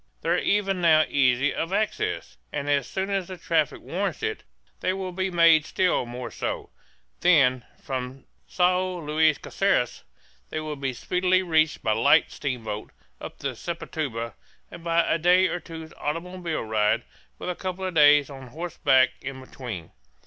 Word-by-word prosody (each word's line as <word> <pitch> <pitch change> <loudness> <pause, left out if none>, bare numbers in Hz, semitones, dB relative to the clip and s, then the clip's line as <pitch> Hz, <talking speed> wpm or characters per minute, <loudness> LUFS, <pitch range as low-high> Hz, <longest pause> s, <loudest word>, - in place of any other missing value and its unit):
They - - -2
are 175 - +3
even 195 -2 +1
now 155 -2 +5
easy 135 0 +2
of 165 - -3
access; 205 - -1 0.2
and 140 - -3
as 140 -2 +1
soon 190 +1 -3
as 195 -3 -1
the 185 - -7
traffic - - 0
warrants - - -3
it 440 -1 -2 0.4
they 185 - 0
will 190 -1 -4
be 190 +1 -1
made 170 -3 +5
still 180 -7 +1
more 120 0 -6
so; - - -4 0.5
then, 135 -8 +4 0.2
from 130 0 -5 0.2
Sao 185 0 +1
Luis 155 -1 +2
Caceres, - - 0 0.5
they 155 - -3
will 155 -1 -4
be 135 -2 -3
speedily 185 +7 +1
reached 160 -3 +2
by 110 - +1
light 115 +7 +4
steamboat 115 -6 -4 0.3
up - - -8
the 135 -2 -4
Sepotuba 135 -6 -4 0.4
and 170 - -10
by 170 0 +3
a 165 - +1
day 180 +3 +5
or 175 - -1
two's 160 -2 -10
automobile 170 +2 -3
ride, 110 -1 +1 0.3
with 180 - -3
a - - -5
couple 185 +1 -4
of 185 - -3
days 145 -2 +6
on 135 -2 -10
horse 165 +6 -7
back 130 -1 +5
in 135 -1 -6
between. 120 -9 -8
155 Hz, 165 wpm, -25 LUFS, 130-180 Hz, 0.5 s, days